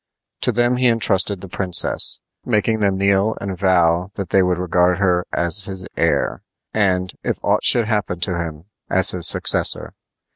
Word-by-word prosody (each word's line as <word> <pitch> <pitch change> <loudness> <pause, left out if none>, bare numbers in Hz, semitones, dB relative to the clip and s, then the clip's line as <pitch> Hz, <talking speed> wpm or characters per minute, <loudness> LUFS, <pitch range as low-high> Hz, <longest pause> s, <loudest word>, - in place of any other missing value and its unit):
To - - +1
them 120 +2 +1
he 125 0 +2
intrusted 100 -4 +1
the 95 - -7
princess, 90 0 +2 0.2
making 110 -1 0
them 100 -2 0
kneel 100 +2 +1
and 100 -1 -5
vow 90 -1 +1
that 100 -2 -6
they 95 - +4
would 90 -1 0
regard 90 0 +1
her 90 -3 0
as 85 +3 +1
his 95 -2 -4
heir, - - -1 0.3
and, 95 -3 0
if - - -2
aught - - +1
should 115 -3 +2
happen 105 -5 -2
to 90 -2 -1
him, 80 -1 -6 0.2
as 95 0 +2
his 90 -2 0
successor. - - +2
95 Hz, 170 wpm, -19 LUFS, 90-105 Hz, 0.3 s, they